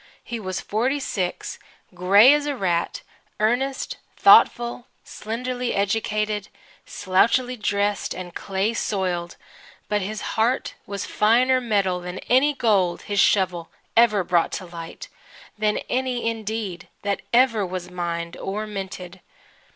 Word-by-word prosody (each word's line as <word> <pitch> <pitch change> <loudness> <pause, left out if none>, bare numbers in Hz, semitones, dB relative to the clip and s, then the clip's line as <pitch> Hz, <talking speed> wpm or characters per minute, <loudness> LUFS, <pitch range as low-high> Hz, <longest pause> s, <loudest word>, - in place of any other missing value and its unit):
He 235 - -5
was 185 -3 -4
forty 250 +7 0
six, 185 -9 -3 0.3
grey 200 +8 +6
as 295 0 0
a 290 - -1
rat, 175 -7 -1 0.4
earnest, 245 +5 0 0.2
thoughtful, 240 +1 +5 0.2
slenderly 245 +3 -4
educated, 210 0 -1 0.4
slouchily 235 +7 +1
dressed 205 -2 -1
and 180 -1 -7
clay 195 +5 -1
soiled, 180 -6 -2 0.5
but 210 -1 +1
his 210 +3 -4
heart 235 +4 0
was 200 -1 -4
finer 250 +4 +3
metal 200 -6 +1
than 180 +1 -7
any 280 +4 +4
gold 200 -8 +1
his 205 -1 -2
shovel 185 -5 +2 0.3
ever 215 -4 +5
brought 175 -1 +1
to 185 - -4
light 170 -1 -9 0.5
than 215 0 0
any, 250 -2 -1
indeed, 220 -5 -4 0.2
that 200 -1 -1
ever 235 -3 +4
was 180 -1 -5
mined 170 -1 -4
or 210 +3 -4
minted. 190 -3 -7
210 Hz, 125 wpm, -23 LUFS, 185-235 Hz, 0.5 s, grey